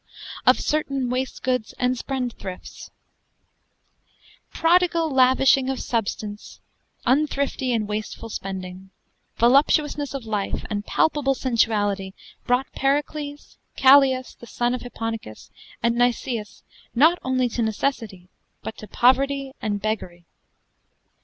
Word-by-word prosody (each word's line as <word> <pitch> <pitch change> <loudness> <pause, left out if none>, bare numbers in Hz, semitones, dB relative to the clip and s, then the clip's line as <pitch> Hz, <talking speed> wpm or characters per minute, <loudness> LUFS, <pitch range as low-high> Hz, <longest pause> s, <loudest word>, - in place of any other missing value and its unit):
OF - - +6
CERTAINE 275 -4 -1
WASTGOODES 255 -2 -2
AND 250 0 +1
SPENDTHRIFTES 245 -8 -6 1.6
Prodigall 335 -1 +2
lavishing 260 0 +4
of 265 - -2
substance, 210 -2 -4 0.5
unthrifty 275 -1 +1
and 220 -3 0
wastifull 215 +2 -5
spending, 190 -1 -6 0.5
voluptuousness 285 +3 +3
of 265 -4 -5
life 210 -3 -2
and 205 0 -3
palpable 285 -3 +1
sensuality 205 -6 0 0.3
brought 250 +2 +1
Pericles, 290 +1 -2 0.2
Callias, 265 -1 +5
the 235 - -12
sonne 240 +1 -1
of 250 - -3
Hipponicus, 225 - -6 0.3
and 235 0 +3
Nicias 240 -2 -1 0.3
not 320 +8 +5
only 255 -1 +1
to 235 - -3
necessitie, 220 -4 -2 0.4
but 220 - -5
to 215 - -9
povertie 270 +3 +2
and 205 -1 -1
beggerie. 180 -5 -3
250 Hz, 105 wpm, -23 LUFS, 215-275 Hz, 1.6 s, OF